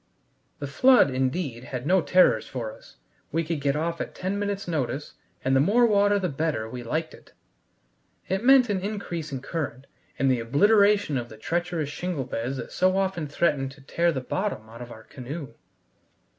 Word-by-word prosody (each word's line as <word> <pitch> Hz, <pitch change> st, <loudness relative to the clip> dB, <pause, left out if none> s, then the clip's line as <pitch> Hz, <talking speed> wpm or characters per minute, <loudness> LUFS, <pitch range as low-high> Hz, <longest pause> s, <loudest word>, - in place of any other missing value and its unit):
The 145 Hz, -, -5 dB
flood, 245 Hz, -, +5 dB
indeed, 130 Hz, -1 st, -2 dB
had 125 Hz, 0 st, -5 dB
no 185 Hz, +4 st, +4 dB
terrors 180 Hz, -10 st, +4 dB
for 115 Hz, -4 st, -5 dB
us; -, -, -18 dB, 0.4 s
we 165 Hz, +2 st, 0 dB
could 160 Hz, -2 st, -3 dB
get 140 Hz, 0 st, +1 dB
off 165 Hz, +2 st, -2 dB
at -, -, -6 dB
ten 190 Hz, +2 st, -2 dB
minutes' 200 Hz, -1 st, -3 dB
notice, 150 Hz, -3 st, -2 dB, 0.3 s
and 135 Hz, 0 st, +3 dB
the -, -, +5 dB
more 215 Hz, -, +4 dB
water 205 Hz, -2 st, +4 dB
the 190 Hz, -2 st, 0 dB
better 145 Hz, -7 st, -2 dB
we 125 Hz, +2 st, -7 dB
liked 160 Hz, +7 st, -3 dB
it. -, -, -17 dB, 0.9 s
It 190 Hz, +4 st, -1 dB
meant 265 Hz, -1 st, +6 dB
an 200 Hz, -2 st, +1 dB
increasing 170 Hz, -9 st, -4 dB
current 140 Hz, -6 st, -4 dB, 0.3 s
and 135 Hz, -1 st, +3 dB
the 125 Hz, -, +1 dB
obliteration 200 Hz, -, +3 dB
of 120 Hz, 0 st, -7 dB
the 110 Hz, -, -12 dB
treacherous 170 Hz, +3 st, -2 dB
shingle 160 Hz, -1 st, -3 dB
beds 125 Hz, +2 st, -3 dB
that -, -, -7 dB
so 185 Hz, +1 st, +2 dB
often 190 Hz, -5 st, -1 dB
threatened 145 Hz, -3 st, 0 dB
to 135 Hz, -, -17 dB
tear 170 Hz, +5 st, +1 dB
the 135 Hz, -5 st, -3 dB
bottom 130 Hz, -, -3 dB
out 115 Hz, +2 st, -11 dB
of 120 Hz, 0 st, -8 dB
our 110 Hz, -, -11 dB
canoe. 140 Hz, +5 st, -8 dB
155 Hz, 185 wpm, -26 LUFS, 130-190 Hz, 0.9 s, meant